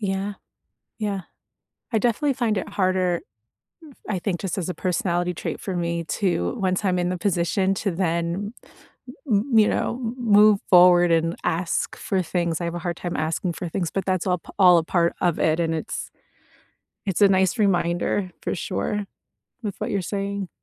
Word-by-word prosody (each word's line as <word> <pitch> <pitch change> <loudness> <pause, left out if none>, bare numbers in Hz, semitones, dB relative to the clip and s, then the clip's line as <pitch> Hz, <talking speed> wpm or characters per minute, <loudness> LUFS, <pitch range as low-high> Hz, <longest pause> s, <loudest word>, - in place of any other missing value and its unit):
Yeah. 195 0 -2 0.6
Yeah. 205 -3 -2 0.7
I 225 - +2
definitely 245 +5 +1
find 235 -5 0
it 190 - -3
harder 185 -3 +1 0.7
f - - -14 0.2
I 205 -3 -1
think, 175 -1 -2
just 195 -1 -3
as 180 - -2
a 180 - -3
personality 180 -1 0
trait 175 - -5
for 190 - -4
me 170 -1 -1
to 165 - -1
once 185 +1 0
I'm 185 -2 +2
in 175 0 0
the 180 - -1
position 190 +1 +1
to 200 +1 -1
then 170 +3 -1
m - - -21 0.6
m 205 -1 +4
m - - +6
you 210 - +5
know, 235 - -1
m 230 +2 -3
move 210 -3 +5
forward 175 -1 +7
and 165 +1 +2
ask 165 +1 -1
for 190 -1 -1
things 170 -1 -1
I - - -1
have 170 0 -3
a - - -3
hard 175 0 -3
time 175 -1 -4
asking 160 +3 -1
for 175 0 -5
things, 175 -2 -2
but 195 -2 -2
that's 185 -2 0
all 180 -2 +1
p - - -19
all 180 -2 +7
a - - -2
part 170 0 +1
of 175 -3 +2
it, 160 +1 +2
and 165 -1 0
it's 160 - -5 1.0
it's 195 -1 -1
a 200 - +8
nice 190 +3 +2
reminder, 180 -1 +1
for - - -2
sure, 205 +3 -2 0.6
with 205 -3 -3
what - - -2
you're 200 - 0
saying. 200 0 -3
185 Hz, 190 wpm, -24 LUFS, 170-200 Hz, 1.0 s, a